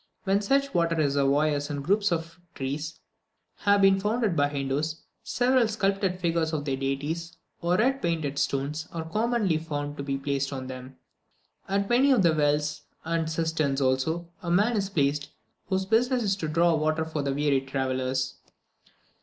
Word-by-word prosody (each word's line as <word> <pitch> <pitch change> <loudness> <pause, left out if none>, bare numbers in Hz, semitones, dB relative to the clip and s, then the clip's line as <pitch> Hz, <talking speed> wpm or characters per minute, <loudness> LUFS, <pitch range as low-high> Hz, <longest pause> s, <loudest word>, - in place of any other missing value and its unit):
When 195 0 +2
such 275 +6 +1
water 170 -1 +2
reservoirs 145 0 +1
and 145 -1 -3
groups 200 +4 +2
of 165 +1 -3 0.2
trees 145 +4 -4 0.6
have 200 -1 +3
been 195 0 +5
founded 210 -1 0
by 145 -1 +2
Hindoos, 145 +3 -2 0.2
several 250 -1 +2
sculptured 195 -3 0
figures 165 -2 0
of 145 -2 -2
their 135 -2 0
deities, 145 +6 -3 0.2
or 175 +1 +2
red 265 +5 +2
painted 155 -5 -1
stones, 145 +4 -1
are 165 -2 -5
commonly 215 -3 +1
found 145 -2 -4 0.2
placed 140 -1 -1
on 130 -2 -5
them. 130 0 -9 0.7
At 200 0 +1
many 250 +5 +4
of 250 -8 +4
the 170 -2 +4
wells, 150 0 +1 0.2
and 165 -1 -1
cisterns 160 -4 0
also, 140 +6 0
a 175 - -4
man 205 +7 +3
is 195 -2 0
placed, 145 -4 0 0.4
whose 190 0 0
business 240 +4 +2
it - - -2
is 195 -1 +2
to 160 - -3
draw 170 +2 +3
water 155 0 +1
for 160 -2 -3
the 140 -1 -1
weary 145 -2 +2
travellers. 130 -1 -2
160 Hz, 160 wpm, -27 LUFS, 145-195 Hz, 0.7 s, been